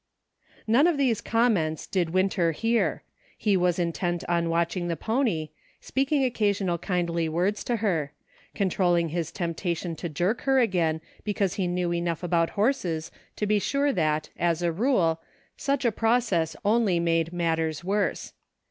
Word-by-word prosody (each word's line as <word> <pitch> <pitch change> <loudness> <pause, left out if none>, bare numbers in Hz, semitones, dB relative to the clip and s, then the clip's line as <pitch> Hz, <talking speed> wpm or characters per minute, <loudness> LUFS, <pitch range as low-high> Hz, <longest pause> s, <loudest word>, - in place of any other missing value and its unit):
None 245 +9 +4
of 340 -4 +1
these 255 -6 +1
comments 205 -10 +1
did 180 -4 -1
Winter 185 -1 +1
hear; 230 +7 0 0.3
he 210 -3 +2
was 180 -2 +2
intent 175 0 -1
on 170 -1 +1
watching 170 +1 0
the 170 - -1
pony, 220 - -1 0.3
speaking 275 +1 0
occa 235 -5 +1
sional 185 -4 -1
kindly 170 -3 -1
words 180 +6 0
to 240 - 0
her; 175 -10 -1 0.4
controlling 175 -3 +1
his 165 0 -3
temp 170 -3 -3
tation 170 -1 -2
to 170 - -4
jerk 180 +10 -1
her 270 -1 +2
again, 175 -9 +1 0.2
because 200 -3 0
he 190 -3 -1
knew 175 -1 -1
enough 170 -1 -2
about 170 -1 +1
horses 195 - 0 0.2
to 210 - -1
be 210 0 +2
sure 280 +6 +1
that, 155 -3 0
as 170 0 +1
a 170 - +2
rule, 170 -5 +1 0.3
such 275 -1 -1
a 235 - +4
process 225 -7 +1
only 210 -4 +3
made 165 -1 +1
matters 165 -2 -1
worse. 200 +2 -1
180 Hz, 155 wpm, -26 LUFS, 170-220 Hz, 0.4 s, None